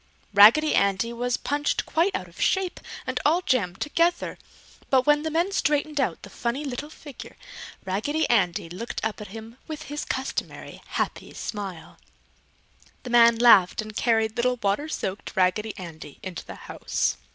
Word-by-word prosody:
Raggedy 225 +10 +7
Andy 200 +4 +1
was 245 +1 -1
punched 290 +2 -1
quite 360 +4 +1
out - - -4
of - - -12
shape 380 -2 +1 0.3
and - - -2
all 335 +4 +3
jammed 195 - 0
together, 335 +4 0 0.5
but 260 -2 +3
when 295 0 +4
the 315 - -2
man 340 +5 0
straightened 295 -4 +1
out 260 - -2
the - - -9
funny 250 +5 -3
little 275 +2 -5
figure, 290 -4 -11 0.5
Raggedy 285 +12 0
Andy 180 -8 +1
looked 185 +8 -5
up 220 0 -3
at 210 - -7
him 225 +3 -10
with 310 -1 -6
his 295 0 -5
customary 265 +1 -4
happy - - -3
smile. 190 -6 -6 1.0
The 250 - -6
man 235 -1 +7
laughed 225 -6 +6
and 215 -1 -5
carried 225 -1 +1
little 250 +1 +2
water 205 +10 0
soaked 195 -8 -4
Raggedy 195 +4 +1
Andy 165 -5 -9
into 185 -3 -6
the - - -9
house. - - -1
240 Hz, 160 wpm, -25 LUFS, 205-295 Hz, 1.0 s, Raggedy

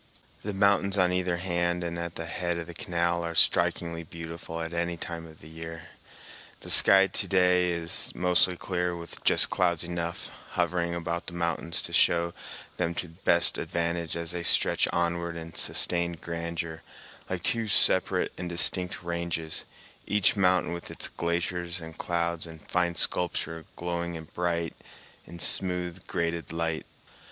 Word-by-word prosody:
The 105 - -4
mountains 100 0 +2
on 90 -1 +3
either 90 -1 0
hand 85 -1 0
and 85 0 -4
at 85 0 -5
the 85 - -5
head 85 +1 -2
of 85 - -4
the 85 - -9
canal 85 -4 -1
are 85 0 -4
strikingly 85 0 +2
beautiful 85 0 -7
at 80 +1 -4
any 85 0 -1
time 85 0 -6
of 80 -1 -16
the 75 - -12
year. 80 +1 -8 0.7
The - - -1
sky 95 0 +7
to - - -2
day 90 -1 +3
is 85 -1 0
mostly 90 0 +2
clear, 90 -1 -2
with 85 -1 -9
just - - +4
clouds 85 -3 +2
enough 85 0 -4 0.2
hovering 85 0 0
about 85 0 -3
the 85 - -5
mountains 85 -1 -1
to - - -5
show 85 0 +3 0.4
them 85 -1 -1
to 90 - -4
best 85 0 +2
advantage 85 -1 -2
as 85 0 -3
they 90 -1 -3
stretch 85 - +5
onward 85 0 -1
in 80 0 -8
sustained 85 -1 +2
grandeur 85 -1 -4 0.5
like 90 -2 -3
two 115 -1 +2
separate 100 - +4
and 90 -1 -3
distinct 90 +1 +2
ranges, 85 -2 -3 0.4
each 105 0 +4
mountain 90 -3 +2
with 85 - -6
its - - -5
glaciers 85 +1 -2
and 80 -1 -10
clouds 85 -1 -1
and 80 -2 -12
fine 85 -1 0
sculpture 80 -2 +1
glowing 85 -1 -3
bright 85 -1 -1 0.5
in 85 - -10
smooth, 90 +2 0
graded 85 -1 -2
light. 80 -1 -2
85 Hz, 155 wpm, -28 LUFS, 85-90 Hz, 0.7 s, sky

